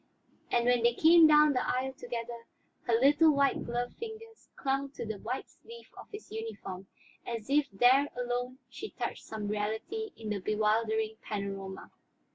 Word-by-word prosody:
And 240 -1 +2
when 245 -1 +3
they 235 0 +3
came 325 +2 +7
down 300 -1 +6
the 250 - 0
aisle 260 +1 -1
together, 235 -2 -6 0.4
her 235 - +4
little 290 +5 +5
white 280 0 +2
gloved 245 +1 -3
fingers 450 0 -9
clung 275 +1 -1
to - - -6
the 220 -2 -5
white 250 +6 -4
sleeve 465 0 -14
of - - -11
his 415 +1 -10
uniform 205 -4 -6 0.4
as 230 +1 -5
if 290 0 +3
there 255 +7 +5
alone 245 +1 -2
she 425 - -8
touched - - -5
some 215 -2 -5
reality 220 - -3
in 220 -2 -6
the 205 - -1
bewildering 220 +2 0
panorama. 195 -2 -5
245 Hz, 160 wpm, -30 LUFS, 220-280 Hz, 0.4 s, came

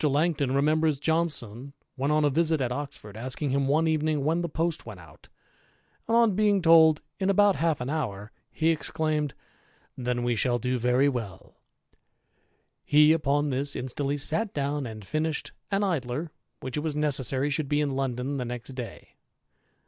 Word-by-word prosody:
Langton 145 -2 +1
remembers 155 +1 +2
Johnson, 140 -5 -1 0.2
when 140 +2 -1
on 150 0 +3
a 145 - +2
visit 160 +1 +2
^ 130 - 0
^ - - -9
Oxford, 140 -6 -6
asking 130 +5 -3
him 140 0 +1
one 155 +4 +2
evening 155 -2 0
when 160 +4 +1
the 170 - -3
post 165 +1 -2
went 105 -5 -10
out; 80 - -17 0.8
and 230 +1 +3
on 220 -4 +3
ing 205 -2 +4
told 160 -2 +6 0.2
in 190 0 0
about 200 0 +4
half 165 -2 +1
an 125 - -4
hour, 110 -9 -3 0.2
he 160 0 0
exclaimed, 155 -2 -1 0.3
' - - -35
Then 125 -1 -2
we 120 -1 +1
shall 120 +2 +1
do 125 +1 -1
very 125 +4 +3
^U.' 115 -10 -5 1.3
He 150 +1 +5
upon 145 -2 +1
this 140 +2 -1
instantly 140 +3 -2
sat 180 +9 -1
down 140 -1 -1
and 110 -2 -9
finished 155 +7 -2 0.2
an 200 0 +1
Idler 145 -7 -1
^ 170 - -10 0.3
which 130 +1 -5
it 150 - -2
'^ 155 -2 -2
necessary 140 -1 0
should 140 0 -2
be 145 - +2
in 145 -2 0
London 135 +1 -2
the 125 - -3
next 120 +1 -6
day. 125 -5 -8
145 Hz, 180 wpm, -27 LUFS, 130-160 Hz, 1.3 s, told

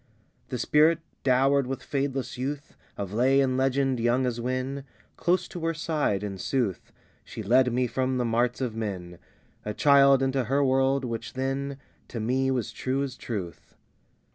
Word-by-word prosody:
II 110 -4 -37
The 125 - -3
Spirit, 155 +6 +4 0.2
dowered 135 +1 +3
with 135 0 -4
fadeless 135 -2 -2
youth 140 +3 -5 0.2
Of 100 -1 -5
Lay 130 +5 +3
and 130 -2 +2
Legend, 135 -1 +1
young 120 +3 +2
as 120 -1 -2
when, 130 +3 -2 0.3
Close 180 +2 +1
to 175 - -7
her 165 0 0
side, 150 - -1
in 100 -2 -5
sooth, 115 -4 -2 0.3
She 110 - -8
led 125 +4 +4
me 125 +2 +1
from 130 +2 -1
the 125 - 0
marts 120 +2 0
of 120 -4 -2
men, 90 -6 -5 0.4
A 105 0 -4
child, 140 -2 +5
into 135 -1 0
her 140 +4 +2
world, 135 0 +2
which 115 -2 -5
then 135 +1 -2 0.3
To 115 - -6
me 130 +4 +1
was 125 -5 -1
true 135 +2 -1
as 135 -3 -5
truth. 95 -11 -6
130 Hz, 170 wpm, -27 LUFS, 120-135 Hz, 0.4 s, child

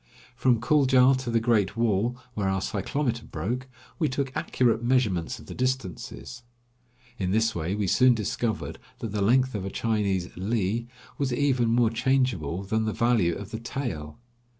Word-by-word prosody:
From 125 -1 +3
Kuldja 130 0 +5
to 130 -2 -4
the 115 0 +2
Great 110 -3 +1
Wall, 115 +1 +1 0.2
where 100 -3 -1
our 95 0 0
cyclometer 120 +5 -2
broke, 125 +3 -4 0.3
we 155 - +2
took 135 0 -3
accurate 120 -2 +1
measurements 120 -9 +1
of - - -13
the - - -8
distances. 95 - -3 0.8
In 95 -2 -1
this 110 +3 +2
way, 85 +3 -2
we 105 -1 -1
soon 125 +6 +5
discovered 110 +1 -2 0.2
that 115 - -5
the 105 0 -2
length 130 +5 +3
of 100 -3 -3
a 95 - -3
Chinese 100 -5 -1
li 110 +3 -1 0.3
was 140 -2 0
even 130 -2 +2
more 115 -1 +3
changeable 115 - 0
than 110 +3 0
the 110 - -1
value 115 -8 +2
of 100 +2 -8
the 110 - -4
tael. 110 - -4
115 Hz, 165 wpm, -26 LUFS, 100-125 Hz, 0.8 s, Kuldja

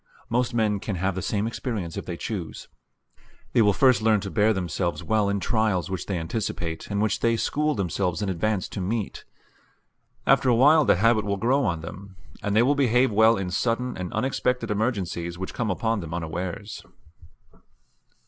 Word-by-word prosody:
Most 125 +1 +1
men 110 -4 +1
can 100 0 -4
have 95 +2 -1
the 95 - -4
same 105 +3 -1
experience 110 -7 -4
if - - -6
they 85 - -4
choose. 95 -5 -5 0.9
They 115 - +5
will 105 -2 +5
first 125 +4 +4
learn 110 -1 +3
to 100 - -5
bear 105 +1 +3
themselves 90 -2 -2
well 110 -2 +1
in 100 0 0
trials 105 -4 0
which 95 - -4
they 95 - -1
anticipate 85 -2 -4
and 100 -1 -1
which 110 -2 0
they 115 0 +2
school 150 +5 0
themselves 90 0 -1
in - - -1
advance 95 +2 -1
to 100 - -5
meet. 105 +2 -3 1.0
After 130 - +4
a 120 - +4
while 150 +5 +6
the - - +5
habit 110 +3 +3
will 100 -1 -1
grow 130 +7 +2
on 85 -5 -1
them, 95 +4 -9 0.3
and 105 0 -1
they 110 - +5
will 135 +4 +3
behave 130 -3 +3
well 110 +2 +5
in 95 -2 -3
sudden 120 +5 -1
and 90 -1 -5
unexpected 125 -3 -1
emergencies 95 -6 -2
which 95 +1 -5
come 115 -3 -2
upon 110 +3 0
them 85 -2 -5
unawares. 90 +5 -5
105 Hz, 185 wpm, -25 LUFS, 95-115 Hz, 1.0 s, while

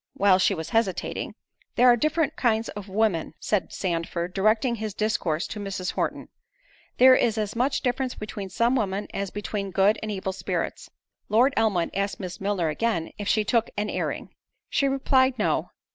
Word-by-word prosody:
While 190 -2 +4
she 195 - +3
was 160 -1 -6
hesitating— 210 -6 -1 0.4
"There 250 - +4
are 245 - +8
different 310 +5 0
kinds 225 -2 +1
of 205 -1 -8
women," 190 -6 0
(said 210 -4 -1
Sandford, 170 -1 -2
directing 215 +5 +2
his 215 -2 -4
discourse 180 -7 0
to 215 - -6
Mrs. 195 -2 -3
Horton;) - - -3 0.7
"there 260 +1 +8
is 230 -3 +2
as 210 0 -2
much 255 +4 +1
difference 255 0 -1
between 205 -2 -6
some 235 +6 +2
women, 205 -4 -1
as 200 0 -2
between 205 0 -4
good 195 +3 +3
and 220 - -4
evil 190 -1 -3
spirits." 195 - -3 0.4
Lord 245 +6 +4
Elmwood 195 -7 +1
asked 200 +1 -2
Miss 185 -2 -6
Milner 195 -5 0
again—If 200 +2 -2
she 215 0 +3
took 225 +2 +1
an 210 +1 -1
airing? - - -3 0.4
She 275 - +2
replied, 265 -1 +2
"No." - - 0
210 Hz, 170 wpm, -25 LUFS, 190-230 Hz, 0.7 s, are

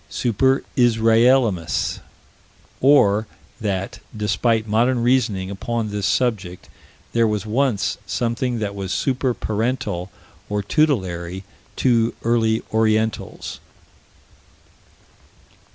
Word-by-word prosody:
Super 130 +3 +1
Israelimus 115 -5 +3 0.8
Or 110 -6 +4 0.3
that, 100 -3 -3 0.2
despite 110 +2 +1
modern 120 +3 +2
reasoning 110 -7 +1
upon 115 +2 -3
this 105 -1 -2
subject, 100 -8 -1 0.4
there 115 -1 +3
was 105 -2 -2
once 110 -3 0
something 120 +2 -1
that 105 -2 -3
was 95 -2 -5
super 130 -2 0
parental 110 -4 -2 0.4
or 105 0 -1
tutelary 95 - 0 0.3
to 115 -3 +2
early 115 -1 +1
orientals. 110 0 0
110 Hz, 90 wpm, -21 LUFS, 100-120 Hz, 0.8 s, Or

